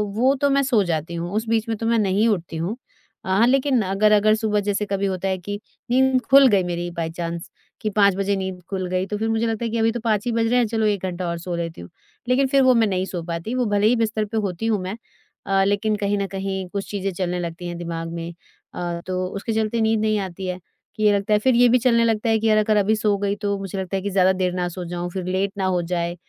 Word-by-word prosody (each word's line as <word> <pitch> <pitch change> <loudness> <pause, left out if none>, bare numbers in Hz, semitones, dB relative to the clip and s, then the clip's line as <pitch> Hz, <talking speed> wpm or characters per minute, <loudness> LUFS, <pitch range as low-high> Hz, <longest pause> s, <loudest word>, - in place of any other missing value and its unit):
वो 255 +5 +3
तो 285 - +3
मैं 275 0 +3
सो 245 -6 +2
जाती 165 -1 -2
हूँ। 170 +2 -4
उस 220 - 0
बीच 225 -1 +1
में 225 - -1
तो 225 - -4
मैं 230 0 +2
नहीं 205 +2 +2
उठती 175 -7 -1
हूँ। 175 +7 -2 0.5
अ, - - -8
हाँ 200 +5 +4
लेकिन 265 -1 +3
अगर-अगर 210 +2 +3
सुबह 215 -1 0
जैसे 205 +1 -1
कभी 200 0 -1
होता 190 0 -2
है 190 -1 0
कि 205 +3 -6 0.3
नींद 260 0 +3
खुल 275 0 +8
गई 200 -6 +3
मेरी 175 0 -3
बाय 170 -1 -3
चांस 170 0 -5 0.3
कि 215 - -1
5:00 200 -2 +3
बजे 195 +1 0
नींद 190 -1 -4
खुल 190 -2 -2
गई 185 +1 0
तो 210 - -3
फिर 225 +1 -1
मुझे 225 +1 +1
लगता 225 +1 -2
है - - -1
कि 230 - -1
अभी 225 0 +2
तो 240 - -4
5:00 215 -2 0
ही 240 - 0
बज 230 0 +1
रहे 245 +2 +2
हैं 245 - +3
चलो 220 0 0
एक 205 -3 0
घंटा 180 0 -3
और 170 - -2
सो 175 0 -4
लेती 165 - -5
हूँ। 85 - -11 0.4
लेकिन 265 +2 +3
फिर 275 0 +3
वो 255 -1 +6
मैं 225 -2 +4
नहीं 185 -1 -1
सो 180 -3 -5
पाती। 170 +6 -4
वो 250 - +1
भले 205 0 +2
ही 245 - +4
बिस्तर 220 -2 0
पे 220 +2 -4
होती 200 -1 -2
हूँ 220 -3 +1
मैं 185 +3 -4 0.7
लेकिन 205 +2 +1
कहीं 205 0 0
न 200 - -1
कहीं 190 -1 -4
कुछ 200 +1 -5
चीजें 195 -1 -2
चलने 180 0 -2
लगती 175 0 -5
हैं 175 - -5
दिमाग 165 -1 -5
में। 170 0 -5 0.4
अ, 175 -1 -4
तो 185 0 -1
उसके 200 +4 -4
चलते 220 +1 0
नींद 220 0 +2
नहीं 215 -1 +1
आती 185 +1 -8
है 180 0 -3 0.4
कि 215 - -3
ये 210 -1 +5
लगता 200 +1 0
है 210 - +4
फिर 255 +2 +2
ये 245 +1 +6
भी 250 - +5
चलने 235 -1 +3
लगता 225 0 +1
है 220 - +3
कि 225 - 0
यार 215 -1 +4
अगर 215 0 +3
अभी 210 +2 +3
सो 210 -2 +1
गई 200 0 -1
तो 200 -1 0
मुझे 195 0 -5
लगता 190 0 -3
है - - -3
कि 200 - -1
ज़्यादा 190 -1 +3
देर 185 -1 -1
ना 180 -1 -1
सो 175 0 -6
जाऊँ 175 +1 -4
फिर 185 -1 -4
लेट 190 +2 -1
ना 195 - -1
हो 180 -2 +1
जाए। 170 0 -2
200 Hz, 275 wpm, -22 LUFS, 180-220 Hz, 0.7 s, खुल